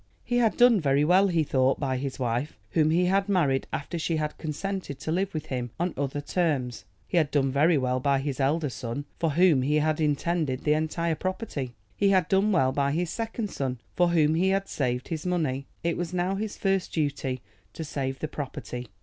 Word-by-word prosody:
He 245 0 0
had 230 -3 +2
done 240 -5 +6
very 140 0 +3
well, 185 +4 +5
he 170 -4 +2
thought, 130 -2 +2
by 130 -3 -1
his 135 +1 -4
wife, 125 +2 -2
whom 155 -1 +3
he 175 +3 +3
had 195 +2 +2
married 150 -9 +2
after 165 +4 -3
she 165 0 0
had 150 -1 -2
consented 175 0 -4
to 155 - -3
live 190 +3 0
with 155 -3 -4
him 125 -4 -3
on 175 0 0
other 140 +1 -2
terms. 145 -7 -1 0.2
He - - -1
had 155 -4 +3
done 135 -2 +1
very 150 +4 +4
well 130 -1 0
by 140 +1 +2
his 135 0 -3
elder 145 +1 +1
son, 125 +3 -5
for 165 -3 +1
whom 170 -4 +5
he 145 +4 +1
had 155 +1 +1
intended 150 -2 0
the 150 - +3
entire 160 +2 0
property. 160 - -4 0.2
He 200 - +3
had 185 -4 +3
done 195 +2 +3
well 130 -9 +3
by 140 +1 0
his 170 +1 -1
second 225 -2 -3
son, 130 -2 -2 0.2
for 175 - +4
whom 160 -3 +3
he 180 +4 +2
had 195 0 +1
saved 125 -2 -2
his 160 -2 -3
money. 145 -7 -1 0.2
It 170 0 0
was 175 0 -3
now 180 +2 +1
his 210 +1 -3
first 195 -2 0
duty 140 -4 -1 0.3
to 160 - -5
save 135 -3 -3
the 155 - -3
property. 125 -4 -6
155 Hz, 210 wpm, -27 LUFS, 135-180 Hz, 0.3 s, done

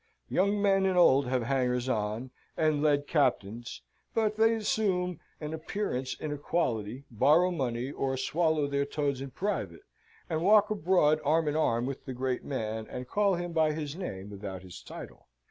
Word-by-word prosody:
Young 200 +2 +2
men 195 -1 +3
and 185 -1 +1
old 140 -6 +5
have 125 -1 0
hangers 125 0 0
on, 110 +1 -2 0.3
and 155 -2 +2
led 145 -1 +2
captains, 120 -6 -1 0.3
but 215 -1 +1
they 225 +1 +4
assume 190 -5 0 0.2
an 150 0 -5
appearance 160 -6 -3
of 155 - -4
equality, 130 -6 -2
borrow 150 - +4
money, 130 -5 -2
or 135 -2 -2
swallow 155 +2 +1
their 140 0 0
toads 140 -2 -2
in 135 - -5
private, 205 - -3 0.4
and 160 -2 -1
walk 210 +3 +5
abroad 165 -6 +3
arm 155 +2 +2
in 150 - 0
arm 120 -6 +1
with 135 0 -5
the 130 - -5
great 130 0 -2
man, 110 -4 -3
and 125 0 -6
call 205 -2 +2
him 175 0 -4
by 160 -2 +3
his 150 -1 -4
name 105 - -6
without 95 -2 -7
his 90 -1 -10
title. - - -10
145 Hz, 170 wpm, -29 LUFS, 125-175 Hz, 0.4 s, old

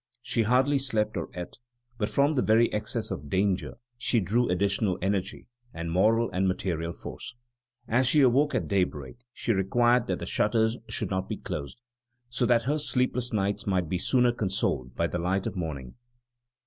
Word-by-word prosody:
She 115 - 0
hardly 130 +5 +3
slept 110 -5 0
or 85 - -3
ate; 90 0 -7 0.4
but 105 - 0
from 140 +2 +2
the 130 - +1
very 115 +1 +3
excess 110 +1 -2
of 70 +1 -5
danger 95 +1 0 0.2
she 120 -1 +2
drew 115 +5 +1
additional 100 +1 +1
energy, 95 +1 -2 0.3
and 85 0 -4
moral 110 +6 +3
and 95 +1 +1
material 85 -3 -2
force. 125 - -9 0.5
As 125 +3 +2
she 150 +3 +5
awoke 135 +3 +3
at - - -1
daybreak, 90 - -1
she 115 - -1
required 120 +5 +2
that - - -1
the - - -6
shutters 110 +1 +1
should - - -2
not 95 0 -2
be - - -3
closed, 70 - -6 0.5
so 120 0 0
that 120 -1 +3
her 145 +5 0
sleepless 125 -3 0
nights 100 -2 -1
might 90 -4 0
be 90 - -1
sooner 125 +4 +3
consoled 95 - -2
by 85 - +1
the 85 +1 -2
light 90 +3 0
of - - -3
morning. 75 -8 -5
105 Hz, 175 wpm, -27 LUFS, 90-120 Hz, 0.5 s, she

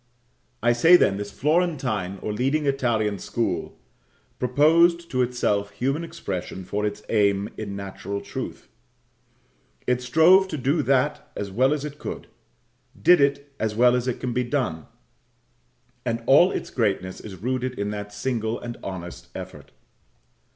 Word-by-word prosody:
I 120 0 +4
say, 165 +9 +7
then, 100 - +4
this 100 0 -5
Florentine 130 - 0
or 105 - -2
leading 135 +7 0
Italian 115 -7 0
school - - -2 0.6
proposed 165 +7 +3
to 130 - +1
itself 110 -5 0
human 135 +10 -2
expression 95 - -5
for 105 +3 -1
its 105 +1 -6
aim 100 -2 +2
in 100 -2 -5
natural 100 0 -5
truth; - - -7 1.2
it 125 0 +1
strove 160 +9 +5
to 160 - -4
do 140 +4 +1
that 135 +1 0
as 100 -1 -4
well 130 +7 +3
as 150 -1 -1
it 150 0 -8
could - - -6 0.7
did 175 -4 +6
it 140 0 0
as 110 -1 -1
well 125 +2 +5
as 125 0 -1
it 125 - -2
can 125 -2 -3
be 125 - +1
done 120 - -2 1.2
and 115 -1 -2
all 160 +7 +6
its - - -4
greatness 95 -5 -1
is 100 -3 -9
rooted 125 +5 -3
in 100 +1 -2
that 105 0 -6
single 110 +1 -2
and 120 -1 -7
honest 90 -2 -7
effort. - - -9
125 Hz, 150 wpm, -24 LUFS, 105-140 Hz, 1.2 s, say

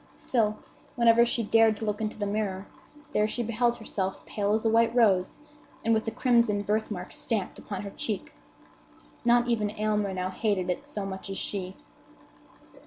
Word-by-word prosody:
Still, 215 -4 0 0.4
whenever 235 -1 +5
she 235 -1 0
dared 225 0 +4
to 220 - -4
look 210 0 -2
into 215 -1 -3
the 205 - -2
mirror, 200 -2 -2 0.5
there 210 - +3
she 240 +2 -2
beheld 235 +1 +1
herself 195 -4 -4
pale 205 -1 -1
as 220 +1 0
a - - +4
white 230 +1 +3
rose 195 -6 +3 0.5
and 230 - +4
with 220 0 +1
the - - 0
crimson 235 -3 +2
birthmark 210 -3 -2
stamped 210 -5 -2
upon 200 -1 -6
her 200 - -6
cheek. 210 -1 -4 0.9
Not 240 0 +4
even 220 -3 +1
Aylmer 210 -1 0
now 185 0 -2
hated 190 -3 0
it 180 - -5
so 205 -2 -3
much 190 0 -6
as 195 - -4
she. 190 -2 -4
215 Hz, 175 wpm, -28 LUFS, 200-230 Hz, 0.9 s, whenever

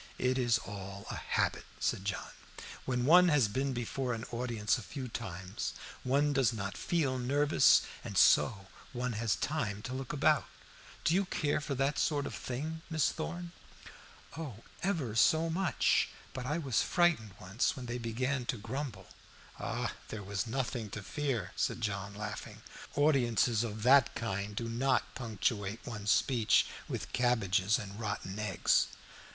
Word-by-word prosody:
"It 130 +1 +1
is 120 -2 +3
all 100 -2 -7
a - - -4
habit," - - -1
said 95 - -1
John. 100 -3 -3 0.5
"When 125 -1 0
one 180 +5 +8
has 145 -9 +4
been 135 +6 -1
before 125 +1 -2
an 115 - -6
audience 115 -3 0
a 120 - -4
few 130 +4 -6
times 95 -1 -5 0.3
one 140 +3 +2
does 135 -5 +3
not 100 -3 -4
feel 140 -7 0
nervous, 145 +4 +5 0.2
and - - -5
so 100 -3 +5 0.3
one 125 0 -2
has 110 -1 +1
time 105 -5 -2
to 125 - -4
look 130 0 -4
about. 150 +1 +3 0.6
Do - - +3
you 195 +2 +3
care 150 -4 0
for 145 -2 -3
that 135 +3 +1
sort 145 -3 +1
of - - -5
thing, 155 +6 -4
Miss 160 -2 +2
Thorn?" 175 +2 -5 0.8
"Oh, 140 -9 -7 0.2
ever 165 - -1
so 160 +8 +4
much. 175 -2 +2 0.2
But 125 -1 -5
I 150 +3 0
was 135 -9 +1
frightened 165 - +2
once, 95 +11 0
when 130 -3 -7
they 120 +1 -3
began 125 +3 -1
to 125 - -1
grumble." 115 -3 -5 1.0
"There 105 -2 -6
was 100 +3 -2
nothing 120 -2 -2
to 105 - -6
fear," 130 - -2
said - - 0
John, 100 -2 -3
laughing. 105 0 -6 0.3
"Audiences 120 -6 +3
of 110 -2 -4
that 130 +1 +6
kind 100 -1 -3
do 115 +2 -2
not 130 +3 +1
punctuate 110 -2 -2
one's 105 -3 -4
speeches 120 -3 +4 0.2
with - - -5
cabbages 110 -5 +2
and 105 -3 -7
rotten 105 -2 -4
eggs." 105 -4 +2
120 Hz, 155 wpm, -32 LUFS, 105-140 Hz, 1.0 s, one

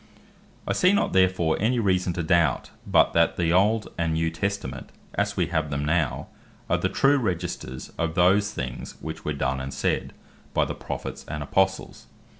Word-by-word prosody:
I - - +1
see 180 +2 +4
not 205 - +1
therefore 95 -4 +3
any 120 +5 +2
reason 95 -5 +1
to 85 - -2
doubt, 80 -4 +2 0.2
but - - +4
that 85 0 +3
the 85 -1 +1
Old, 105 +4 +3
and 80 -1 +1
New 80 0 0
Testament, 85 -8 -4 0.2
as - - -1
we 90 - +2
have 80 -2 0
them 70 +1 -2
now, 80 -1 0 0.5
are - - +4
the - - 0
true 140 +1 +3
Registers 85 - -4
of 85 -1 -1
those 100 +3 +4
things, 65 -9 -6
which 80 0 -7
were 75 - -2
done 65 -1 -1
and 65 +1 -5
said 65 - -1 0.4
by - - +3
the - - -4
Prophets, - - -6
and 75 -1 -4
Apostles. 95 +5 0
85 Hz, 180 wpm, -25 LUFS, 75-95 Hz, 0.5 s, see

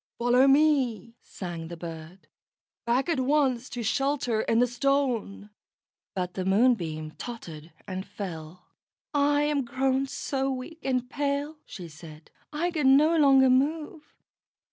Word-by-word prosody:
"Follow 245 +3 +4
me," 270 -7 +2
sang 170 -3 -7
the 170 +1 -8
bird. 165 +2 -9 0.6
"Back 250 +5 +1
at 330 -6 0
once 260 -2 +1
to 245 -3 -5
shelter 255 -1 0
in 225 - +1
the 245 - +5
Stone." 245 -5 -1 0.6
But 180 -1 -3
the 185 - -3
Moonbeam 185 -7 +1
tottered 170 -10 -8 0.2
and 185 0 -4
fell. 175 -3 -8 0.5
"I 290 0 +3
am 295 -2 +1
grown 265 +2 0
so 270 0 -2
weak 265 +6 -6
and 255 -2 -1
pale," 285 +2 -2
she 180 -4 -8
said, 155 0 -13 0.2
"I 330 +4 -1
can 275 -5 +4
no 310 +3 +3
longer 270 -4 +5
move." 300 +4 -1
255 Hz, 135 wpm, -27 LUFS, 190-280 Hz, 0.6 s, the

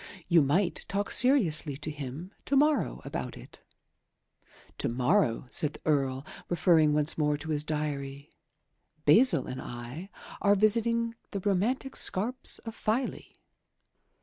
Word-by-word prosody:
You 170 -2 +5
might 170 +7 0
talk 200 +1 -2
seriously 170 - +4
to 150 +2 -6
him 150 +5 -7
to 280 - 0
morrow 300 +2 +1
about - - -5
it." - - -14 1.2
"To - - -1
morrow," 125 - +1
said 150 -1 +1
the - - -14
Earl, 135 -2 0 0.2
referring 165 -3 +3
once 150 +1 0
more 150 -1 +1
to 160 +2 -6
his 150 -1 -1
diary, 145 -2 -4 0.7
"Basil 235 - +5
and 130 0 -6
I 120 +10 -8 0.3
are 200 0 +4
visiting 230 +3 +2 0.2
the 200 - -4
romantic 210 +8 -1
scarps 240 +7 0
of 225 - -6
Filey." 230 +4 -3
165 Hz, 130 wpm, -28 LUFS, 145-215 Hz, 1.2 s, You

